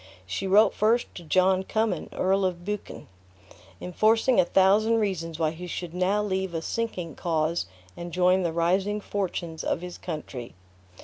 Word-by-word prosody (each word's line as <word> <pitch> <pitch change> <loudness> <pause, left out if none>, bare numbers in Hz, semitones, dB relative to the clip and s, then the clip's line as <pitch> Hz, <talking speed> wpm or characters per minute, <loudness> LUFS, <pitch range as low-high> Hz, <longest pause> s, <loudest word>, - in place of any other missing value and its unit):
She 95 - -3
wrote 210 +3 +5
first 225 +3 +1
to - - -9
John 185 +4 +3
Cummin, 215 -4 -1
Earl 195 +1 +1
of 175 -2 -2
Buchan, 210 0 -5 0.7
enforcing 220 +7 +2
a - - +5
thousand 200 +5 +4
reasons 170 -7 -2
why 160 -2 +1
he 175 +2 -8
should 175 -1 -5
now 190 +3 +1
leave 190 -3 -2
a 165 - -1
sinking 185 -9 -3
cause 165 - -1 0.3
and 175 0 -7
join 180 +2 +3
the 170 -2 0
rising 190 +5 +1
fortunes 180 -5 -4
of 170 - -1
his 180 -1 -8
country. 145 -7 -6
185 Hz, 160 wpm, -26 LUFS, 170-205 Hz, 0.7 s, wrote